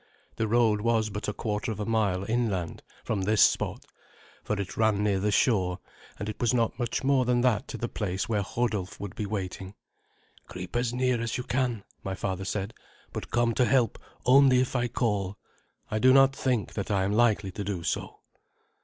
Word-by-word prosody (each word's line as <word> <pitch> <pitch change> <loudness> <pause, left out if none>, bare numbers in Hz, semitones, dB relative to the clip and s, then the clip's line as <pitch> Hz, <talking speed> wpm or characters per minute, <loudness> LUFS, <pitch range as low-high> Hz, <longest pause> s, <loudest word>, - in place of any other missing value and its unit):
The 110 - 0
road 110 -2 +3
was 110 -1 +1
but 105 +1 -4
a 105 - -1
quarter 105 +2 -2
of 105 - -6
a 105 - -2
mile 100 -5 +1
inland 110 -8 -1 0.2
from 105 -3 -1
this 105 +2 +4
spot, - - +1 0.6
for 105 - -2
it 100 - -4
ran 110 -2 +2
near 100 -2 +2
the 105 +2 0
shore, 95 -6 +2 0.4
and 105 - -5
it 105 - -6
was 120 +1 +2
not 115 0 0
much 120 +1 -2
more 135 -1 +3
than 125 0 +2
that 125 0 +1
to - - -6
the 120 - -2
place 95 -5 -3
where 105 -3 0
Hodulf 105 -3 -2
would 100 -2 -6
be 105 - -4
waiting. 95 -1 -5 0.7
"Creep 90 +2 -8
as 120 -1 +1
near 125 -1 +1
as 115 -1 -2
you 125 - -3
can," 125 -5 -1 0.2
my 95 0 -3
father 95 0 -3
said; 100 +2 -3 0.4
"but - - -5
come 120 0 +2
to 125 - +3
help 125 -4 +2 0.3
only 130 0 +6
if 130 +1 -1
I 120 -1 +1
call. 105 -5 -1 0.5
I 110 - 0
do 130 +3 +6
not 135 0 +6
think 125 -5 -1
that 100 - -4
I 100 -2 +2
am 95 - 0
likely 110 -4 +2
to 100 - -5
do 95 -4 -3
so." - - -3
110 Hz, 200 wpm, -28 LUFS, 100-120 Hz, 0.7 s, only